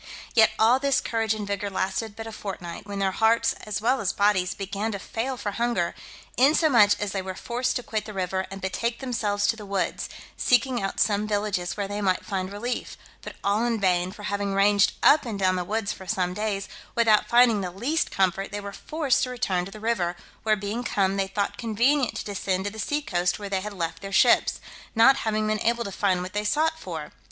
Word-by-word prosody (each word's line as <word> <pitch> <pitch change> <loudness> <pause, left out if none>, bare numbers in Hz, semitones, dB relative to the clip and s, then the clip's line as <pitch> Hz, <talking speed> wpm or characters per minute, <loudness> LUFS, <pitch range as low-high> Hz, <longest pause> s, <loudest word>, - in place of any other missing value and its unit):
Yet 220 -2 +6
all 235 +4 +5
this 275 -1 +2
courage 225 -1 0
and 210 -1 -4
vigour 200 0 -2
lasted 195 +3 -2
but 225 - -7
a 225 - -6
fortnight, 190 -4 -7
when 200 0 -5
their 195 -1 +1
hearts, 230 +3 +3
as 210 0 -2
well 255 +4 +2
as 195 - 0
bodies, 200 -3 +2
began 200 +3 -3
to - - -2
fail 240 +6 -4
for 205 - -3
hunger; 235 -6 0 0.4
insomuch 260 -5 +5
as 205 -1 -2
they 195 - -2
were 190 0 -6
forced 240 +5 -2
to 245 - -2
quit 215 -3 -3
the 215 - -7
river, 190 0 -2
and 195 0 -8
betake 230 +5 -2
themselves 210 -6 -1
to 225 - +2
the 215 - -10
woods, 195 -3 -2 0.3
seeking 250 -1 +2
out 195 - -3
some 210 0 +2
villages 205 -4 -1
where 200 -1 -2
they 205 +1 -4
might 185 -2 0
find 190 -1 -3
relief, 240 +5 -4 0.2
but - - -8
all 205 +3 +2
in 235 -2 0
vain; 180 -2 +1
for 210 +1 -11
having 200 -1 -2
ranged 200 0 +4
up 300 - +6
and 225 -4 -4
down 185 -1 +2
the 180 - -1
woods 210 +3 -2
for 190 - -12
some 180 0 0
days, 200 -1 -2 0.3
without 225 -3 +4
finding 235 -3 +5
the 185 - -3
least 250 - -1
comfort, 190 0 0
they 205 - -3
were 200 0 -7
forced 300 +3 0
to 255 - 0
return 195 -8 -1
to 195 - -9
the 215 - -10
river, 210 -6 0 0.3
where 215 -1 +2
being 210 +4 -4
come, 195 -4 +1
they 195 -1 0
thought 200 +1 -2
convenient 245 +4 +1
to - - -4
descend 190 -2 -2
to 205 - -2
the 220 - -10
sea 295 +7 -1
coast 180 -4 0
where 205 -1 -6
they 190 -1 0
had 210 +2 -5
left 165 -4 -4
their 195 - -7
ships, 235 +4 +4 0.4
not 265 +5 +6
having 215 -1 0
been 215 0 0
able 235 +1 +1
to 200 - -6
find 185 -2 +1
what 185 - -7
they 210 0 -1
sought 315 +9 +1
for. - - -6
205 Hz, 225 wpm, -25 LUFS, 195-230 Hz, 0.4 s, Yet